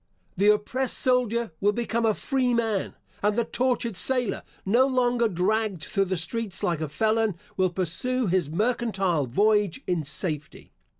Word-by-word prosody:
The 200 Hz, +2 st, +2 dB
oppressed 245 Hz, +5 st, 0 dB
soldier 235 Hz, -4 st, +2 dB
will 205 Hz, +1 st, +3 dB
become 235 Hz, 0 st, -1 dB
a 215 Hz, -, +2 dB
freeman; 235 Hz, -6 st, 0 dB, 0.3 s
and 210 Hz, +2 st, +1 dB
the 235 Hz, -, +2 dB
tortured 245 Hz, -4 st, -1 dB
sailor, 250 Hz, +3 st, +1 dB, 0.2 s
no 240 Hz, +7 st, +4 dB
longer 245 Hz, -2 st, +2 dB
dragged 200 Hz, -1 st, -1 dB
through 195 Hz, -2 st, 0 dB
the 185 Hz, 0 st, -2 dB
streets 190 Hz, +4 st, -3 dB
like 170 Hz, -3 st, 0 dB
a 155 Hz, -, -3 dB
felon, 220 Hz, +5 st, +1 dB, 0.2 s
will 185 Hz, -1 st, +2 dB
pursue 190 Hz, +9 st, -1 dB
his 180 Hz, -5 st, +1 dB
mercantile 195 Hz, -, 0 dB
voyage 205 Hz, -, +2 dB
in 175 Hz, -3 st, -1 dB
safety. 150 Hz, 0 st, -4 dB
210 Hz, 145 wpm, -26 LUFS, 185-235 Hz, 0.3 s, no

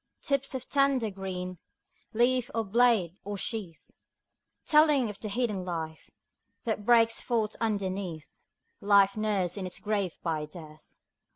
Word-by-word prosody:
Tips 275 Hz, -1 st, 0 dB
of 260 Hz, -1 st, -5 dB
tender 275 Hz, -6 st, +2 dB
green, 185 Hz, -2 st, -5 dB, 0.5 s
Leaf, 245 Hz, +1 st, +2 dB
or 225 Hz, -, +1 dB
blade, 210 Hz, -5 st, +3 dB
or 205 Hz, 0 st, -5 dB
sheath; 195 Hz, -6 st, -5 dB, 0.7 s
Telling 300 Hz, -7 st, +4 dB
of 205 Hz, -, -13 dB
the 215 Hz, -, -5 dB
hidden 210 Hz, -4 st, -1 dB
life 160 Hz, -3 st, -5 dB, 0.5 s
That 220 Hz, -2 st, -3 dB
breaks 230 Hz, -1 st, +4 dB
forth 220 Hz, -3 st, -1 dB
underneath, 190 Hz, -7 st, -3 dB, 0.4 s
Life 200 Hz, -1 st, +4 dB
nursed 205 Hz, -4 st, 0 dB
in 185 Hz, -, -3 dB
its 180 Hz, -, -6 dB
grave 205 Hz, -5 st, -1 dB
by 155 Hz, -3 st, -2 dB
Death. 155 Hz, -1 st, -13 dB
205 Hz, 130 wpm, -29 LUFS, 185-235 Hz, 0.7 s, Telling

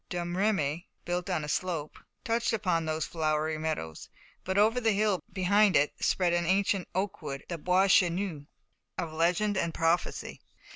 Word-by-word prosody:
Domremy, 175 Hz, -3 st, -1 dB, 0.2 s
built 175 Hz, +2 st, -2 dB
on 175 Hz, -5 st, -1 dB
a -, -, -5 dB
slope, 160 Hz, -1 st, -3 dB, 0.2 s
touched 230 Hz, -1 st, 0 dB
upon 180 Hz, -7 st, 0 dB
those 155 Hz, -1 st, -1 dB
flowery 155 Hz, -1 st, -1 dB
meadows, 155 Hz, -, -4 dB, 0.3 s
but 190 Hz, +1 st, -2 dB
over 225 Hz, +4 st, +3 dB
the 225 Hz, -2 st, +2 dB
hill 205 Hz, -2 st, +1 dB
behind 200 Hz, +2 st, +3 dB
it 145 Hz, +1 st, +3 dB
spread 180 Hz, -2 st, +2 dB
an 175 Hz, -1 st, +1 dB
ancient 195 Hz, 0 st, +1 dB
oakwood, 190 Hz, -8 st, -3 dB
the 170 Hz, -, -3 dB
Bois 180 Hz, +4 st, +3 dB
Chesnu 175 Hz, -5 st, +2 dB, 0.5 s
of 160 Hz, -2 st, -4 dB
legend 180 Hz, +6 st, +1 dB
and 170 Hz, -3 st, -1 dB
prophecy. 165 Hz, +1 st, -1 dB
175 Hz, 150 wpm, -29 LUFS, 160-195 Hz, 0.5 s, over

